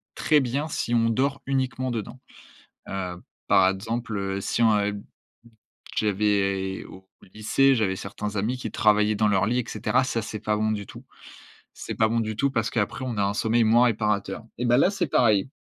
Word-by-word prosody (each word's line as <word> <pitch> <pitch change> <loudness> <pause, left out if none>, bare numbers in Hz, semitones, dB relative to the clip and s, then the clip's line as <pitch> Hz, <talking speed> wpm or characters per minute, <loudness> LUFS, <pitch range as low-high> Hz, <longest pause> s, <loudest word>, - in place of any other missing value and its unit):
très 150 -2 +3
bien 135 +4 -2
si 120 -5 -3
on 115 -1 +3
dort 135 +4 0
uniquement 130 -1 -1
dedans. 115 +2 -5 0.7
Heu, 90 -2 -4 0.3
par 95 -1 +5
exemple, 110 +3 -3
heu, 95 0 -2
si 115 - -1
on 110 -2 +4
ub 105 0 -3 0.9
j'avais 100 -2 0
au 95 0 -14 0.3
lycée, 135 +5 +3
j'avais 100 -4 0
certains 105 +1 -6
amis 110 +6 0
qui - - -6
travaillaient 105 0 +3
dans 105 +1 +2
leur 100 -1 +2
lit 125 +2 +1
et 120 - -2
cetera. 130 +1 0
Ça, 115 -3 -1
c'est 110 0 -6
pas 105 0 -1
bon 110 +1 0
du 105 -2 -3
tout. - - -12 0.7
C'est - - -6
pas 110 -1 +2
bon 115 +1 0
du 110 -1 -3
tout 140 +2 +1
parce 115 -3 -1
qu'après, 115 +3 -2
on 120 -4 -4
a 100 - +2
un 100 +1 -1
sommeil 115 +2 +2
moins 120 +3 +5
réparateur 105 -2 -1 0.2
et 125 - -2
ben 120 0 +4
là, 180 - +4
c'est 195 -4 -1
pareil. 110 -5 +2
110 Hz, 195 wpm, -25 LUFS, 100-120 Hz, 0.9 s, par